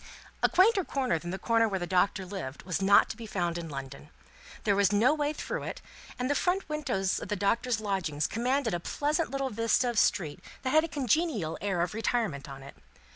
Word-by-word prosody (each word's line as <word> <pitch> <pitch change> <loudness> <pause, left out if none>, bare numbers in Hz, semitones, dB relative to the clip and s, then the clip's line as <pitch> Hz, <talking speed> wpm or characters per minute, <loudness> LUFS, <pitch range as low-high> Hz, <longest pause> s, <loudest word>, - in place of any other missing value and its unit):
A - - +4
quainter 385 +3 +4
corner 260 - -1
than 175 - -7
the 190 - -3
corner 230 +3 +2
where 195 - -1
the 175 - -3
Doctor 185 +1 +1
lived, 180 -8 -6
was 180 +1 -2
not 200 +1 +6
to - - -7
be 225 0 -9
found 175 -5 -1
in 165 -1 -6
London. 140 +1 -8 0.5
There 200 -2 +2
was 200 -1 +3
no 225 +8 +4
way 295 -1 0
through 305 - -4
it, - - -5 0.4
and 250 - -1
the 290 - +2
front 360 +6 0
windows 265 -11 -1
of - - -7
the 210 - -1
Doctor's 225 +4 +1
lodgings 185 -8 -1
commanded 245 +1 0
a 175 - 0
pleasant 300 - -1
little 275 -1 -2
vista 230 +3 +2
of 230 - +1
street 175 -11 +1 0.2
that 260 - 0
had 310 +2 +5
a - - -2
congenial 275 - 0
air 190 -3 0
of 175 - -3
retirement 215 - -1
on 135 0 -9
it. 140 - -11
210 Hz, 215 wpm, -29 LUFS, 180-270 Hz, 0.5 s, not